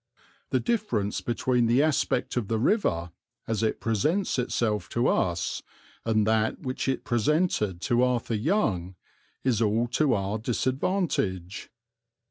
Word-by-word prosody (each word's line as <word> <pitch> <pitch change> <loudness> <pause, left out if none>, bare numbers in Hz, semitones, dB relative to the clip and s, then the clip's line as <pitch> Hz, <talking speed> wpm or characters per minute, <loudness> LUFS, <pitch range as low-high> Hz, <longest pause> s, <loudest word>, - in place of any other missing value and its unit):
The - - +2
difference 160 - -1
between 120 0 +1
the 125 +5 +4
aspect 150 -4 0
of 120 -5 -1
the 115 - 0
river, 110 - +1 0.4
as 115 -2 -1
it 110 - 0
presents 135 - 0
itself 115 -3 -1
to 120 +1 0
us, 85 -2 0 0.4
and 110 -2 +2
that 110 0 +1
which 130 +1 -3
it 135 - -1
presented 120 - +1
to 120 +5 +2
Arthur 125 -2 +1
Young 105 - 0 0.5
is 120 -4 +1
all 110 +2 +2
to 130 +1 +2
our 100 +2 -2
disadvantage. 120 - -1
115 Hz, 130 wpm, -27 LUFS, 105-130 Hz, 0.5 s, the